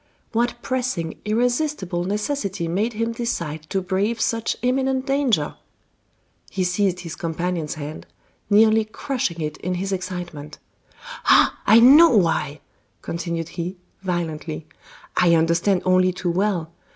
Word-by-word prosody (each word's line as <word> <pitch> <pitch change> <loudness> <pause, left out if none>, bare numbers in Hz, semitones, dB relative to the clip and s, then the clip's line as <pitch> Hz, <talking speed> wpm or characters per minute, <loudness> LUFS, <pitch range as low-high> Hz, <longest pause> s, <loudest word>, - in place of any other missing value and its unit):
What 240 +1 0
pressing, 250 -11 -2
irresistible 230 - 0
necessity 205 -3 -2
made 205 +8 0
him 230 +2 -1
decide 165 -10 -4
to 190 -1 -1
brave 200 +5 0
such 230 0 0
imminent 260 +1 +1
danger?" 270 - +1 1.0
He 190 - -1
seized 180 0 0
his 170 -2 -7
companion's 165 -1 -3
hand, 155 0 -7 0.4
nearly 220 +1 +5
crushing 215 - -3
it 150 0 -3
in 180 0 -3
his 195 +2 -3
excitement: 175 -5 -5 0.7
"Ah! - - +5
I 220 +3 +8
know 290 +8 +8
why!" 160 -5 0 0.4
continued 170 0 -4
he, 175 +2 -5 0.2
violently. 165 -4 -3 0.5
"I 170 -2 +4
understand 170 +4 +2
only 185 0 +4
too 180 -1 -2
well. 180 -3 0
185 Hz, 125 wpm, -22 LUFS, 170-230 Hz, 1.0 s, I